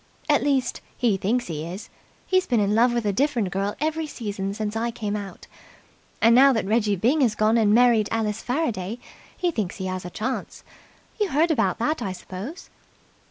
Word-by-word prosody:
"At 295 -2 +3
least, 275 -3 0 0.2
he 235 -5 +2
thinks 225 +6 0
he 155 -3 -5
is. 180 +6 -8 0.3
He's 370 -1 +1
been 240 -3 +2
in 205 0 +1
love 235 +3 +4
with 235 -2 -1
a 205 - +1
different 240 -6 0
girl 195 +2 -2
every 315 +1 -1
season 200 -7 -4
since 215 0 -3
I 230 +1 0
came 210 -3 -3
out. 200 -2 -7 0.8
And 230 +1 +7
now 270 +3 +7
that 225 - -1
Reggie 210 0 +2
Byng 250 - +2
has 230 -5 +2
gone 215 +2 +2
and 220 -3 +3
married 230 -2 +4
Alice 220 -1 -1
Faraday, 235 - -2 0.4
he 355 -1 0
thinks 215 - -3
he 190 - -5
has 185 0 -3
a 180 - -6
chance. 235 +8 -4 0.6
You 415 -2 +1
heard 320 +4 +2
about 310 - +1
that, 305 +7 -1
I 190 - -2
suppose?" 190 - -8
225 Hz, 195 wpm, -24 LUFS, 200-260 Hz, 0.8 s, And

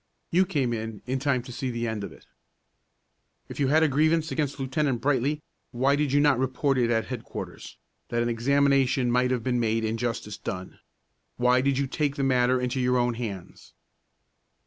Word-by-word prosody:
You 185 +2 +3
came 130 -7 0
in 110 -2 -5
in 130 +1 -1
time 135 -3 0
to 125 - -10
see 130 +1 -3
the 120 -1 -2
end 110 -2 -3
of - - -6
it." - - -16 1.2
"If - - -8
you 140 - +2
had 155 +4 +4
a - - +5
grievance 155 +3 +2
against 145 -3 -2
Lieutenant 135 -1 0
Brightly, 145 +3 0 0.3
why 135 +3 +2
did 145 -2 0
you 145 - +4
not 145 -3 +4
report 130 +1 0
it 120 -1 +2
at 115 -2 +1
headquarters, 125 -3 -7 0.3
that 120 0 0
an - - -1
examination 135 +1 +2
might 125 +1 +2
have 125 -3 -1
been 125 0 0
made 115 -1 0
and 110 +1 -2
justice 115 -3 -3
done? 90 -1 -6 0.6
Why 125 +1 +3
did 135 0 +1
you 140 - +1
take 140 +1 -1
the 140 - -2
matter 130 -1 +3
into 125 +1 -2
your 125 0 +2
own 120 0 +1
hands?" 105 -7 -7
130 Hz, 190 wpm, -26 LUFS, 120-140 Hz, 1.2 s, a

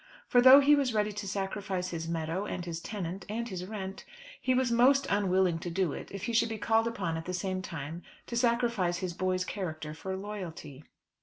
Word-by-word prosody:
For 245 - +5
though 260 +3 +10
he 285 +1 +6
was 265 -5 0
ready 210 0 +1
to 205 0 -5
sacrifice 195 -1 -3
his 165 -1 -4
meadows, 165 +4 -2
and 180 -1 -4
his 170 -1 -5
tenant, 190 -2 -5
and 230 +2 -2
his 185 -4 -5
rent, 195 -2 -6 0.4
he 255 -1 +2
was 255 -1 +2
most 265 +4 +5
unwilling 190 -4 +2
to 175 - -5
do 175 -3 0
it - - -7
if 195 -1 -7
he 235 - -2
should 230 0 +3
be 220 - -3
called 225 +2 +2
upon 180 -8 -2
at 160 - -6
the 180 - -3
same 185 +1 -2
time 165 -3 -6 0.2
to 235 - -6
sacrifice 235 -7 +1
his 180 -1 -3
boy's 185 +1 0
character 160 -7 -5
for 190 +4 -5
loyalty. 175 -8 -7
190 Hz, 210 wpm, -30 LUFS, 175-225 Hz, 0.4 s, though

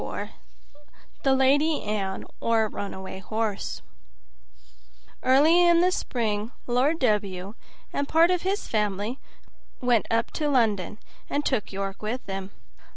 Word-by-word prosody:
24 - - -6 0.9
The 270 -1 +3
Lady 290 +4 +3
Anne, 200 -2 -2
or 230 -1 +2
a - - -4
Runaway 190 -2 -6
Horse 215 +1 -3 1.4
Early 305 +7 +5
in 345 -1 +5
the 365 +1 +4
spring, 220 - -2
Lord 260 +6 +2
W 205 - 0 0.4
and 280 - -1
part 330 +3 +5
of 360 -1 +1
his 390 +2 -1
family 210 +3 -1 0.6
went 245 -3 +2
up 230 0 +1
to 300 -2 -1
London, 215 -6 +1 0.3
and 290 +1 -1
took 255 -6 0
York 195 0 -4
with 225 +4 -3
them. 195 -1 -5
230 Hz, 130 wpm, -26 LUFS, 205-285 Hz, 1.4 s, Early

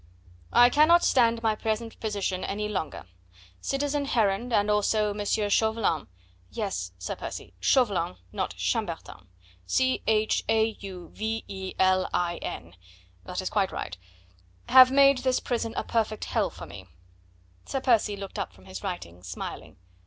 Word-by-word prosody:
"'I 245 0 +6
cannot 320 +5 +5
stand 230 -2 +3
my 220 -1 +3
present 220 +1 -3
position 200 -4 -2
any 210 +1 -2
longer. 185 - -4 0.5
Citizen 285 - -1
Heron, 225 -2 +1
and 210 -2 +2
also 210 0 +2
M. 205 0 -4
Chauvelin 210 -4 +1 0.2
' 90 0 -33
Yes, 195 - -3
Sir 90 - -4
Percy, - - -7
Chauvelin, 195 - +2 0.2
not - - -3
Chambertin... - - -3 0.4
C, 260 - +1
H, 215 0 +2
A, 220 0 +4
U, 185 -3 -8
V, 220 +1 -3
E, 190 -1 -6
L, 185 0 +3
I, 175 -1 0
N.... 85 +2 -7 0.5
That 180 - -3
is 185 - -4
quite 195 -3 +1
right 90 - -5 0.7
'have 255 0 +9
made 275 0 +5
this 255 0 +1
prison 230 -2 -2
a - - 0
perfect 220 -2 -1
hell - - 0
for - - -10
me.'" 95 0 -11 0.8
Sir 270 - -1
Percy 225 -5 +2
looked 195 -1 -7
up - - -4
from - - -19
his 190 +1 -8
writing, 130 - -6
smiling. 90 -1 -7
210 Hz, 155 wpm, -27 LUFS, 190-235 Hz, 0.8 s, have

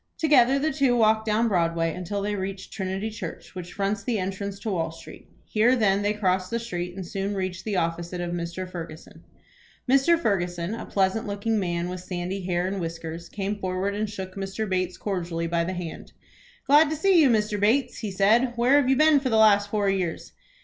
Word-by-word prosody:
Together 275 -4 +4
the 305 +3 0
two 270 -3 +2
walked 220 -1 +3
down 220 +2 +2
Broadway 165 -4 +1
until 190 +3 -4
they 210 +1 -1
reached 190 -1 -5
Trinity 195 +2 -3
Church, 215 - -8
which 180 -2 -8
fronts 200 +1 -1
the 230 +2 -1
entrance 195 +1 -4
to 220 - -3
Wall 165 -4 -1
Street. 165 - -13 0.2
Here 230 +4 +3
then 205 -4 +2
they 205 0 +1
crossed 185 -3 0
the 230 - -1
street, 180 -6 -5
and 190 -2 -6
soon 195 +3 -3
reached 185 -1 -4
the 210 -2 -2
office 170 0 -1
of 180 - -5
Mr. 175 +2 -4
Ferguson. 165 -3 -9 0.6
Mr. 275 +6 +4
Ferguson, 175 - -1
a 230 - -6
pleasant 195 +3 0
looking 205 +2 -1
man 175 -2 -1
with 180 0 -5
sandy 185 +1 -4
hair 175 -1 0
and 190 0 -2
whiskers, 165 0 -6
came 205 0 -3
forward 185 +1 -2
and 210 +1 -2
shook 190 -2 -7
Mr. 195 +3 -4
Bates 185 -1 -1
cordially 175 -4 -3
by 170 0 0
the 185 +2 -3
hand. 175 -3 -7 0.5
"Glad 295 +2 +6
to 315 - -1
see 355 +2 +4
you, 285 - +5
Mr. 210 -2 +1
Bates," 245 +5 +2
he 220 - -4
said. 220 +6 +3
"Where 245 +4 +4
have 260 - -1
you 265 - +4
been 305 +1 +5
for 265 -1 -2
the 225 - +2
last 205 -2 +5
four 205 -1 0
years?" 185 -4 -2
195 Hz, 205 wpm, -25 LUFS, 180-220 Hz, 0.6 s, Glad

